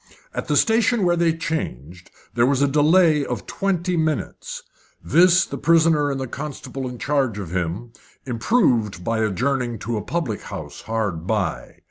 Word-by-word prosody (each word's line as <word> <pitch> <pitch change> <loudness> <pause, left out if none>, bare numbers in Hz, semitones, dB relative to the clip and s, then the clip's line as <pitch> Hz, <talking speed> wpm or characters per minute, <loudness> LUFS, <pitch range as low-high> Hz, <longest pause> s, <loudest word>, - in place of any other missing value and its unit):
At - - -4
the 150 - +2
station 225 - +3
where 175 -1 +3
they 170 -1 +2
changed 90 - -5 0.2
there 120 0 +3
was 140 0 +2
a - - +4
delay 155 +2 +4
of 125 -5 -4
twenty 180 -2 -1
minutes. 155 -3 -2 0.4
This 180 +4 +5
the - - -7
prisoner 160 -3 +3
and 135 -1 -2
the 130 - -2
constable 135 0 -6
in 125 - -8
charge 135 -4 0
of 95 -5 -6
him 90 +6 -3 0.3
improved 115 - +1
by 115 +3 -1
adjourning 120 +3 0
to 115 +2 -3
a - - -2
public 125 - -3
house - - -8
hard 105 -7 -3
by. 95 - -2
135 Hz, 160 wpm, -22 LUFS, 110-165 Hz, 0.4 s, This